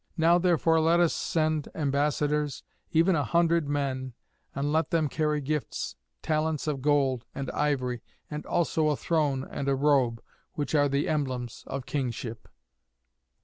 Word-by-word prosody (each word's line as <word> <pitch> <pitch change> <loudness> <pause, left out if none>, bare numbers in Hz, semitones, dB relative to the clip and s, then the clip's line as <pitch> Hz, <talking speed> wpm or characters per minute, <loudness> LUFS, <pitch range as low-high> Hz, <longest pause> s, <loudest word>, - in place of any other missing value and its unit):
Now 170 +2 +5
therefore 165 -2 +3
let 165 +2 +4
us 175 -2 +3
send 155 -2 0
ambassadors, 145 -1 0 0.3
even 170 +3 +4
a 145 - +1
hundred 170 -2 +2
men, 130 -3 -2 0.4
and 140 +1 -1
let 160 +1 +1
them 160 -2 +2
carry 150 0 0
gifts, 150 +1 -3 0.3
talents 155 -1 0
of 145 -4 -2
gold, 135 -4 +2
and 135 -2 -3
ivory, 130 -5 -1 0.3
and 150 0 -5
also 160 -2 +1
a 150 - +2
throne 145 -5 0
and 140 - -4
a 135 - +3
robe, 135 -5 +2 0.3
which 145 +1 -3
are 145 -2 +4
the 140 +4 0
emblems 130 -7 -2
of 135 -2 -4
kingship." 120 -4 -4
150 Hz, 145 wpm, -28 LUFS, 135-160 Hz, 0.4 s, Now